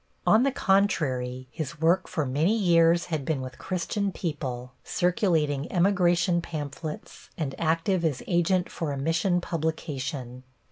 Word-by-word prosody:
On 220 - +6
the 275 +2 +3
contrary, 130 - +1
his 155 +2 -5
work 170 +4 +3
for 155 -4 -1
many 155 - +1
years 170 -3 +4
had 150 -3 -1
been 150 0 -1
with 130 0 -7
Christian 195 +2 -2
people, 130 -8 -4
circulating 165 - +1
emigration 175 -2 +3
pamphlets 155 -1 -7
and 145 -5 -2
active 165 +3 +1
as 150 -6 -1
agent 175 +1 +2
for 160 -3 -3
a 140 - -3
mission 165 +5 +1
publication. 145 -6 -3
165 Hz, 135 wpm, -27 LUFS, 140-180 Hz, -, On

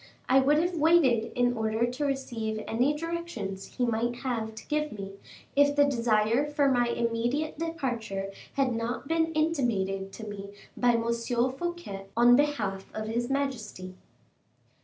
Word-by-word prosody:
I 265 +1 +6
would 285 +3 +4
have 350 +3 +1
waited 295 -8 +4
in 245 0 +2
order 220 +1 +1
to 250 +5 -2
receive 230 -6 -2
any 260 +6 +1
directions 325 - -5
he 250 - +2
might 235 +1 0
have 230 -3 -3
to 220 - -10
give 300 -1 -1
me, 195 -2 -6 0.4
if 285 0 +4
the 290 0 +6
desire 230 -2 +2
for 295 -2 +2
my 245 -1 +3
immediate 235 +6 -1
departure 235 -12 -3 0.2
had 270 -3 +1
not 230 +4 -3
been 325 0 +1
intimated 230 -12 0
to 220 - -8
me 200 -1 -7 0.2
by 245 -1 +3
M. 230 0 +1
Fouquet 245 - -2
on 240 +1 +7
behalf 225 -10 0
of 215 - -3
his 240 +2 -1
majesty." 235 -9 -3
245 Hz, 150 wpm, -28 LUFS, 220-285 Hz, 0.4 s, on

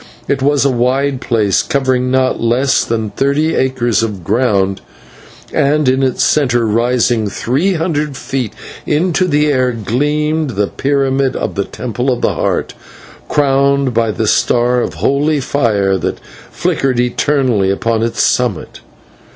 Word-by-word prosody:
It 140 -1 -1
was 140 0 +2
a 140 - +3
wide 130 +2 0
place, 105 -5 +1
covering 130 -2 0
not 130 0 +1
less 120 +4 +2
than 110 -2 -2
thirty 145 +4 0
acres 130 -4 0
of 105 -5 -4
ground, 100 -2 0 0.7
and 150 -1 +2
in 130 +1 +2
its 130 -2 +1
centre, 120 -6 +2
rising 115 0 +1
three 150 - 0
hundred 155 -4 -2
feet 130 -6 -4 0.3
into 180 +4 +1
the 150 -2 +2
air, 130 -2 +1
gleamed 150 +6 -1
the 105 - +2
pyramid 135 +2 0
of - - -3
the 100 -1 -2
Temple 125 +2 -3
of 125 - -2
the - - +1
Heart, - - -2 0.6
crowned 140 -2 +2
by 115 0 +1
the 110 +1 -2
star 120 +3 +2
of - - -4
holy 145 +2 +1
fire 105 -8 0
that - - -3 0.3
flickered 130 -3 -1
eternally 125 -4 +1
upon 110 +3 0
its 115 0 0
summit. 120 -9 -1
130 Hz, 145 wpm, -15 LUFS, 115-140 Hz, 0.7 s, a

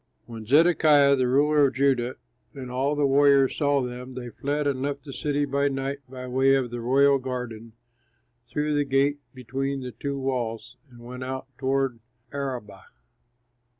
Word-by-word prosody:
When 115 -2 -9
Zedekiah, 150 -1 +5
the 130 -2 +1
ruler 145 +3 +4
of 130 - -6
Judah, 130 -2 +1 0.4
and 130 -2 -7
all 135 +4 0
the 145 -1 +1
warriors 140 -1 +4
saw 145 -2 +1
them, 125 +1 -7
they 120 -2 -7
fled 145 +4 -2
and 135 -2 -1
left 140 +1 -3
the 140 - -8
city 145 0 -1
by 140 +1 0
night 135 0 -3
by 130 -1 -8
the 125 - -7
way 135 +1 +4
of 130 -3 -1
the 120 -1 -5
royal 140 +3 +4
garden, 125 -3 -6 0.8
through 150 0 -1
the 145 0 +2
gate 140 +1 +1 0.2
between 135 +2 -3
the 125 -1 -6
two 140 +5 -5
walls, 125 -3 -3
and 120 -1 -16
went 125 +2 -8
out 130 +1 -5
toward 135 -2 0 0.3
the 140 - -6
Arabah. 120 -8 -5
135 Hz, 175 wpm, -25 LUFS, 125-140 Hz, 0.8 s, Zedekiah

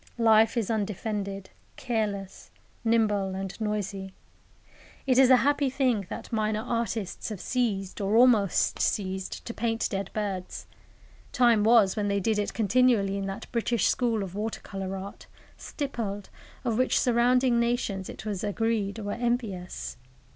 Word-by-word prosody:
Life 225 0 +4
is 230 -2 0
undefended, 200 -2 -3 0.2
careless, 210 -6 -3 0.3
nimble 210 -4 +1
and 195 0 -4
noisy. 200 -2 -3 0.9
It 260 -2 +3
is 265 -2 +7
a 255 - +8
happy 285 -1 +2
thing 250 -7 0
that - - -7
minor 215 0 0
artists 230 -5 -2
have 210 -4 -6
ceased, 205 -7 -2
or 200 +2 +1
almost 230 -6 +4
ceased, 190 -2 -2
to 235 - -5
paint 225 0 -1
dead 195 -2 -3
birds. 195 -4 -4 0.7
Time 235 -4 +4
was 220 -4 +5
when 210 -1 -1
they 200 0 +1
did 210 +2 0
it 205 - -2
continually 220 -2 +3
in 195 -1 -3
that 195 +4 -5
British 235 -3 +1
School 230 -4 +1
of 185 -2 -7
water 215 +2 -4
colour 195 -1 -5
art, 195 +1 -9 0.3
stippled, 220 -9 -5 0.3
of 235 -1 0
which 255 - +3
surrounding 245 0 +3
nations, 235 -5 -1
it - - -9
was 205 -2 -3
agreed, 210 -1 -1
were 205 -2 -4
envious. 230 -7 -3
215 Hz, 145 wpm, -27 LUFS, 195-235 Hz, 0.9 s, a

